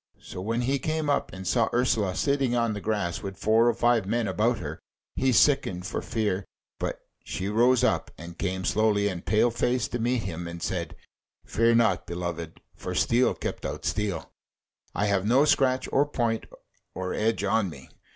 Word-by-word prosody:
So 90 Hz, -, -8 dB
when 115 Hz, +5 st, -1 dB
he 135 Hz, +3 st, 0 dB
came 155 Hz, +1 st, -1 dB
up, 140 Hz, -, 0 dB
and 95 Hz, 0 st, -8 dB
saw 115 Hz, -3 st, +2 dB
Ursula 110 Hz, -6 st, +1 dB
sitting 140 Hz, -4 st, +1 dB
on 115 Hz, -2 st, +1 dB
the 105 Hz, -, -5 dB
grass 100 Hz, -5 st, -1 dB
with 95 Hz, -1 st, -6 dB
four 110 Hz, +2 st, +3 dB
or -, -, +2 dB
five 120 Hz, -4 st, +2 dB
men 115 Hz, +1 st, 0 dB
about 115 Hz, +4 st, +1 dB
her, 80 Hz, -5 st, -6 dB, 0.4 s
he 130 Hz, -, +2 dB
sickened 115 Hz, -8 st, +3 dB
for -, -, -3 dB
fear; 105 Hz, -5 st, -1 dB, 0.4 s
but -, -, -3 dB, 0.2 s
she 95 Hz, -, -4 dB
rose 120 Hz, +4 st, +3 dB
up -, -, +1 dB
and 85 Hz, +1 st, -9 dB
came 95 Hz, 0 st, -3 dB
slowly 105 Hz, -1 st, +2 dB
and 90 Hz, -4 st, -4 dB
pale 110 Hz, +2 st, +3 dB
faced 120 Hz, +1 st, 0 dB
to 120 Hz, -, -2 dB
meet 120 Hz, +1 st, 0 dB
him, 85 Hz, -2 st, -5 dB
and 85 Hz, 0 st, -7 dB
said: 85 Hz, -2 st, -3 dB, 0.5 s
"Fear 115 Hz, +1 st, +3 dB
not, 110 Hz, -6 st, +2 dB
beloved, 85 Hz, -2 st, -5 dB
for -, -, -5 dB
steel 120 Hz, +2 st, +3 dB
kept -, -, -5 dB
out -, -, -5 dB
steel: 105 Hz, -3 st, -2 dB, 0.6 s
I 105 Hz, -, +1 dB
have 100 Hz, -2 st, +1 dB
no 130 Hz, +6 st, +5 dB
scratch 130 Hz, -3 st, +2 dB
or 145 Hz, +2 st, +3 dB
point 115 Hz, -5 st, -1 dB, 0.5 s
or 95 Hz, 0 st, -3 dB
edge 110 Hz, -1 st, 0 dB
on 105 Hz, -1 st, +1 dB
me." 70 Hz, -5 st, -12 dB
110 Hz, 185 wpm, -27 LUFS, 95-120 Hz, 0.6 s, no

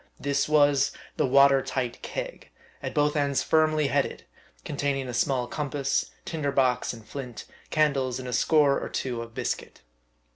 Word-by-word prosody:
This 140 Hz, +1 st, 0 dB
was 145 Hz, -2 st, +4 dB, 0.2 s
the -, -, +2 dB
water 140 Hz, +1 st, +6 dB
tight 125 Hz, -3 st, -3 dB
keg, -, -, -6 dB, 0.3 s
at -, -, -5 dB
both 150 Hz, 0 st, +2 dB
ends 140 Hz, -2 st, +1 dB
firmly 155 Hz, -1 st, +3 dB
headed, 135 Hz, -, 0 dB, 0.4 s
containing 140 Hz, -2 st, -1 dB
a 125 Hz, -, -5 dB
small 125 Hz, +1 st, +1 dB
compass, 140 Hz, 0 st, -1 dB, 0.2 s
tinder 150 Hz, -4 st, -2 dB
box 130 Hz, -3 st, +2 dB
and 115 Hz, -3 st, -11 dB
flint, 125 Hz, -1 st, -7 dB, 0.2 s
candles, 140 Hz, -5 st, +1 dB
and 130 Hz, -1 st, -6 dB
a 125 Hz, -, -4 dB
score 145 Hz, -2 st, +4 dB
or -, -, -4 dB
two 125 Hz, -3 st, -3 dB
of 115 Hz, 0 st, -10 dB
biscuit. -, -, -4 dB
140 Hz, 155 wpm, -27 LUFS, 130-145 Hz, 0.4 s, water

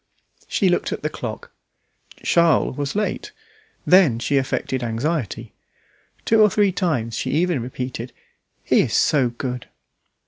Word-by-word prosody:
She 195 Hz, -, +1 dB
looked 175 Hz, -, +1 dB
at -, -, -5 dB
the 150 Hz, -, -1 dB
clock. 110 Hz, -3 st, -7 dB, 0.7 s
Charles 170 Hz, -6 st, +3 dB
was 145 Hz, +3 st, -3 dB
late. 210 Hz, 0 st, -2 dB, 0.5 s
Then, 180 Hz, -10 st, +5 dB
she 140 Hz, +4 st, 0 dB
affected 130 Hz, -1 st, -1 dB
anxiety. 120 Hz, -, -3 dB, 0.7 s
Two 225 Hz, -1 st, +4 dB
or 210 Hz, -, +6 dB
three 200 Hz, 0 st, +2 dB
times 150 Hz, -, -1 dB
she -, -, -3 dB
even 170 Hz, -3 st, +1 dB
repeated, 125 Hz, 0 st, -5 dB, 0.5 s
"He -, -, +3 dB
is -, -, -1 dB
so 135 Hz, -5 st, +3 dB
good!" 125 Hz, 0 st, -5 dB
140 Hz, 135 wpm, -22 LUFS, 125-175 Hz, 0.7 s, or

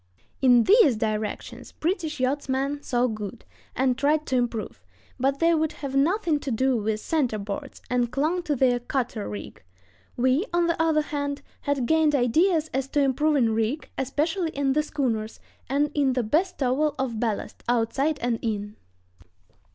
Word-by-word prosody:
In 245 Hz, -3 st, +6 dB
these 390 Hz, -, +6 dB
directions 215 Hz, -1 st, -4 dB
British 320 Hz, -3 st, -2 dB
yachtsmen 275 Hz, +1 st, -1 dB
saw 245 Hz, -3 st, +1 dB
good, 215 Hz, -1 st, -5 dB, 0.3 s
and 255 Hz, -1 st, +2 dB
tried 300 Hz, +3 st, +1 dB
to 260 Hz, -, -1 dB
improve; 240 Hz, -3 st, -2 dB, 0.4 s
but 270 Hz, +2 st, +1 dB
they 335 Hz, +3 st, +3 dB
would 315 Hz, -1 st, +1 dB
have 275 Hz, -2 st, -6 dB
nothing 320 Hz, +2 st, +2 dB
to 285 Hz, -, -5 dB
do 260 Hz, +2 st, +1 dB
with 215 Hz, -1 st, -1 dB
center 255 Hz, -5 st, 0 dB
boards, 210 Hz, +7 st, -6 dB
and 245 Hz, -1 st, 0 dB
clung 310 Hz, +7 st, 0 dB
to 305 Hz, -4 st, -1 dB
their 245 Hz, -2 st, +3 dB
cutter 240 Hz, -, -3 dB
rig. 105 Hz, -1 st, -8 dB, 0.6 s
We, 260 Hz, -, +2 dB
on 345 Hz, 0 st, +2 dB
the 335 Hz, -1 st, 0 dB
other 315 Hz, -2 st, +3 dB
hand, 285 Hz, -2 st, -3 dB, 0.2 s
had 285 Hz, -3 st, -1 dB
gained 315 Hz, +1 st, +3 dB
ideas 315 Hz, +6 st, +2 dB
as 270 Hz, 0 st, -1 dB
to 290 Hz, -, 0 dB
improving 275 Hz, -2 st, +2 dB
rig, 225 Hz, +7 st, -1 dB
especially 320 Hz, +7 st, -1 dB
in 280 Hz, -3 st, 0 dB
the 305 Hz, -, +3 dB
schooners, 240 Hz, -8 st, -2 dB, 0.3 s
and 285 Hz, +2 st, +1 dB
in 275 Hz, -3 st, +2 dB
the 250 Hz, -1 st, 0 dB
bestowal 295 Hz, -, +1 dB
of 245 Hz, -4 st, -2 dB
ballast, 220 Hz, -3 st, -3 dB
outside 255 Hz, +6 st, +1 dB
and 240 Hz, -2 st, 0 dB
in. 210 Hz, -2 st, -3 dB
270 Hz, 160 wpm, -25 LUFS, 240-305 Hz, 0.6 s, In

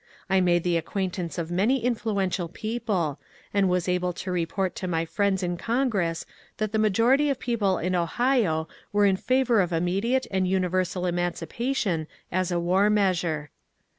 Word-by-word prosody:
I 190 Hz, 0 st, +4 dB
made 175 Hz, -1 st, +3 dB
the 175 Hz, -1 st, +2 dB
acquaintance 180 Hz, 0 st, -3 dB
of 170 Hz, -1 st, -3 dB
many 225 Hz, +8 st, +2 dB
influ 230 Hz, -3 st, -1 dB
ential 175 Hz, -2 st, -3 dB
people, 205 Hz, -, -2 dB, 0.3 s
and 200 Hz, -2 st, +3 dB
was 180 Hz, 0 st, 0 dB
able 180 Hz, 0 st, 0 dB
to 185 Hz, +2 st, -5 dB
report 180 Hz, +2 st, -1 dB
to 185 Hz, -, -3 dB
my 165 Hz, -2 st, 0 dB
friends 195 Hz, +2 st, 0 dB
in 175 Hz, 0 st, -1 dB
Con 250 Hz, +7 st, 0 dB
gress 170 Hz, -7 st, -1 dB, 0.3 s
that 215 Hz, -1 st, -1 dB
the 220 Hz, -, 0 dB
majority 230 Hz, +7 st, +3 dB
of 275 Hz, -, 0 dB
people 215 Hz, -7 st, 0 dB
in 180 Hz, +2 st, -1 dB
Ohio 180 Hz, -2 st, +1 dB, 0.2 s
were 205 Hz, 0 st, +3 dB
in 195 Hz, -1 st, +4 dB
favour 250 Hz, +1 st, +2 dB
of 180 Hz, -1 st, -1 dB
immediate 195 Hz, +10 st, +1 dB
and 190 Hz, -1 st, +1 dB
universal 185 Hz, -1 st, 0 dB
emancipation 175 Hz, -, -1 dB, 0.2 s
as 185 Hz, 0 st, 0 dB
a 175 Hz, -, +1 dB
war 185 Hz, +4 st, +3 dB
measure. 175 Hz, -7 st, +1 dB
185 Hz, 165 wpm, -26 LUFS, 175-215 Hz, 0.3 s, I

